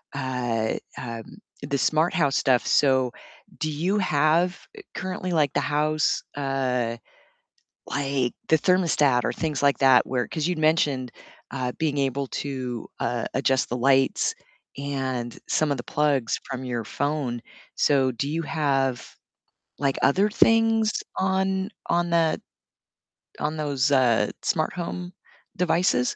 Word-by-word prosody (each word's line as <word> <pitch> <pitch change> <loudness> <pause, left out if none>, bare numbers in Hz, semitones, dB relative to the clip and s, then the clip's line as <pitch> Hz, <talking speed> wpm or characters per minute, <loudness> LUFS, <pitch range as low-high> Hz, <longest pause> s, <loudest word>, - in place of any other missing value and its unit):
uh, 125 -4 -1 0.2
um, 115 -2 -7 0.2
the 140 - -2
smart 155 +6 +2
house 145 -7 +2
stuff, 130 -3 +2
so 130 -3 +3 0.5
do 155 - -1
you 175 +8 0
have 170 +1 +2 0.4
currently, 185 -1 -4
eh, - - -1
like 145 -4 +3
the - - +2
house, 150 +1 +1
uh, 130 -4 -1 0.9
like 135 -3 -1 0.2
the 160 - +6
thermostat 150 -8 +3
or - - 0
things 155 -4 -2
like 140 -1 +3
that 130 -2 +6
where 125 -2 0
'Cause 155 0 -2
you'd 180 -2 -1
mentioned, 150 -5 +2 0.4
uh, 130 -2 -2
being 155 -3 -1
able 135 0 0
to, 130 -5 -4
uh, 120 -2 -1
adjust 130 0 +1
the 120 - -2
lights 135 +1 +2 0.4
and 130 -4 -3
some 155 -2 +1
of 140 - 0
the - - -5
plugs 145 -5 0
from 130 -1 -4
your 120 -3 -3
phone, 140 -3 -2 0.3
so 135 -3 +3
do 140 +4 -3
you 165 +2 -2
have 135 -6 -1 0.7
like 140 -1 0
other 190 +10 +4
things 225 0 +3 0.2
on 190 0 0 0.2
on 175 0 +1
that 165 -2 +2 1.0
on 150 +1 -2
those, 145 -2 0
uh, 120 -6 +3
smart 160 -6 0
home 180 +1 -5 0.4
devices? 165 -7 +2
140 Hz, 135 wpm, -25 LUFS, 130-160 Hz, 1.0 s, the